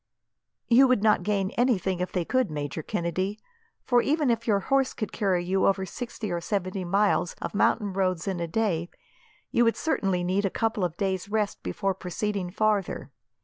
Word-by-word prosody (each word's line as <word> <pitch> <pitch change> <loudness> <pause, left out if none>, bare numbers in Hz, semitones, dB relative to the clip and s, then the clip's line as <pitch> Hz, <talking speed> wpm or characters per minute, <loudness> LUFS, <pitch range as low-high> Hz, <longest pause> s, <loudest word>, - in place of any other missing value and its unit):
"You 255 +3 +6
would 255 -5 +2
not 215 -1 +4
gain 200 -2 0
anything 195 -7 +1
if 180 - -2
they 180 -3 -1
could, 255 +1 +1
Major 145 0 -4
Kennedy, 185 +6 -2 0.5
for 245 -1 +3
even 295 -2 +2
if 230 0 -2
your 200 -3 +3
horse 270 +3 +1
could 215 - -4
carry 190 -5 0
you 190 +2 +2
over 195 -1 +1
sixty 230 -1 -6
or 170 0 -2
seventy 185 0 -2
miles 195 -1 +1
of - - -5
mountain 205 -1 +2
roads 185 -2 0
in 190 -3 -1
a 170 - -2
day, 175 -3 0 0.6
you 240 - +4
would 230 -1 +2
certainly 195 - 0
need 185 +3 +1
a 195 - +1
couple 220 -1 -1
of 175 -1 -2
days' 190 -1 -1
rest 210 -1 -1
before 195 -1 -1
proceeding 190 +1 -3
farther. 205 0 0
195 Hz, 185 wpm, -27 LUFS, 180-220 Hz, 0.6 s, You